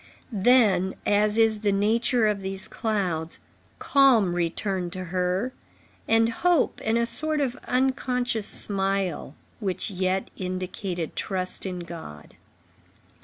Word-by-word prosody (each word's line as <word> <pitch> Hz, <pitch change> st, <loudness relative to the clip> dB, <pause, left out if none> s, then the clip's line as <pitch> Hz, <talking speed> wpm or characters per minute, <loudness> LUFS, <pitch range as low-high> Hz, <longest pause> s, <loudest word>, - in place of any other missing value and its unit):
Then, 205 Hz, -4 st, +3 dB
as 210 Hz, +1 st, +2 dB
is 225 Hz, -1 st, +3 dB
the 205 Hz, -1 st, +1 dB
nature 225 Hz, +4 st, +2 dB
of 210 Hz, -2 st, 0 dB
these 190 Hz, 0 st, -1 dB
clouds, 180 Hz, -7 st, -2 dB, 0.4 s
calm 250 Hz, -10 st, +4 dB
returned 175 Hz, +1 st, -1 dB
to 185 Hz, -1 st, -5 dB
her, 180 Hz, +7 st, -1 dB, 0.5 s
and 225 Hz, 0 st, +4 dB
hope 340 Hz, +7 st, +1 dB
and 220 Hz, +1 st, +1 dB
a 235 Hz, -, +2 dB
sort 310 Hz, +5 st, -1 dB
of 260 Hz, -4 st, 0 dB
unconscious 250 Hz, -3 st, 0 dB
smile, 195 Hz, -7 st, -2 dB, 0.2 s
which 200 Hz, -1 st, -2 dB
yet 185 Hz, 0 st, -1 dB
indicated 185 Hz, -2 st, -4 dB
trust 185 Hz, -1 st, -1 dB
in 180 Hz, -1 st, -4 dB
God. 160 Hz, -, -10 dB
200 Hz, 120 wpm, -25 LUFS, 185-230 Hz, 0.5 s, calm